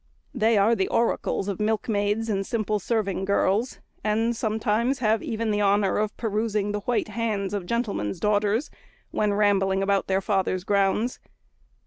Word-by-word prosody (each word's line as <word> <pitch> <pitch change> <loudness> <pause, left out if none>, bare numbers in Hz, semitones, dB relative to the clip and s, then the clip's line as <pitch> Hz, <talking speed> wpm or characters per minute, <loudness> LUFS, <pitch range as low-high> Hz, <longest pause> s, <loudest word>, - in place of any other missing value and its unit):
They 225 -3 +2
are 205 +3 +4
the 195 -4 +1
oracles 230 -3 0
of 200 -3 -3
milkmaids 210 0 0
and 195 -3 0
simple 215 0 -1
serving 200 -3 -1
girls; 200 +4 +1 0.3
and 225 +2 +1
sometimes 220 +3 0
have 220 -3 +1
even 225 -2 -2
the 210 0 0
honour 200 -1 +2
of 215 -1 -2
perusing 215 -2 -1
the 210 - -2
white 230 +1 -1
hands 210 -3 -2
of 195 -4 -3
gentlemen's 205 - -2
daughters, 210 +5 +1 0.4
when 210 -1 +1
rambling 195 -2 +2
about 195 0 +1
their 190 0 +2
father's 190 -2 0
grounds. 200 +4 +1
210 Hz, 150 wpm, -25 LUFS, 200-225 Hz, 0.4 s, are